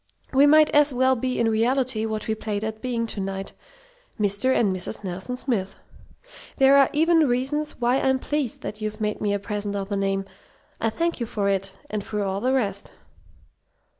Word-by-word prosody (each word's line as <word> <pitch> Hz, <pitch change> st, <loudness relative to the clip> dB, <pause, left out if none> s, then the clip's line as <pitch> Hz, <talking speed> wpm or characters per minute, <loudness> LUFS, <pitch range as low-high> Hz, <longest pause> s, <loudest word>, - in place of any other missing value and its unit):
We 275 Hz, +2 st, +6 dB
might 305 Hz, +1 st, +6 dB
as 295 Hz, 0 st, +5 dB
well 260 Hz, +1 st, +3 dB
be 255 Hz, +1 st, -2 dB
in 235 Hz, -, +2 dB
reality 230 Hz, 0 st, +1 dB
what 215 Hz, -1 st, -4 dB
we 220 Hz, -, +1 dB
played 215 Hz, -1 st, -4 dB
at 220 Hz, 0 st, -4 dB
being 240 Hz, -2 st, -1 dB
to 220 Hz, -, -4 dB
night 195 Hz, 0 st, -4 dB, 0.7 s
'Mr. 205 Hz, +5 st, +1 dB
and 205 Hz, -7 st, +2 dB
Mrs. 185 Hz, +4 st, -4 dB
Nelson 190 Hz, +7 st, -5 dB
Smith.' 225 Hz, -8 st, -2 dB, 0.8 s
There 270 Hz, 0 st, +6 dB
are 275 Hz, -1 st, +6 dB
even 320 Hz, 0 st, +3 dB
reasons 275 Hz, +5 st, -1 dB
why 245 Hz, +2 st, +2 dB
I'm 265 Hz, 0 st, +2 dB
pleased 285 Hz, -2 st, -3 dB
that 215 Hz, -, -6 dB
you've 215 Hz, +1 st, -4 dB
made 210 Hz, -1 st, -2 dB
me 205 Hz, -, 0 dB
a 205 Hz, -, +1 dB
present 205 Hz, 0 st, -4 dB
of 195 Hz, 0 st, -4 dB
the 200 Hz, -, -1 dB
name. 195 Hz, 0 st, -1 dB, 0.5 s
I 225 Hz, -, +1 dB
thank 335 Hz, +8 st, -2 dB
you 235 Hz, -, -2 dB
for 200 Hz, -2 st, -1 dB
it 195 Hz, 0 st, -1 dB
and 210 Hz, -1 st, -4 dB
for 210 Hz, 0 st, -3 dB
all 195 Hz, 0 st, -2 dB
the 255 Hz, +3 st, +1 dB
rest." 200 Hz, -7 st, -1 dB
220 Hz, 195 wpm, -24 LUFS, 205-260 Hz, 0.8 s, We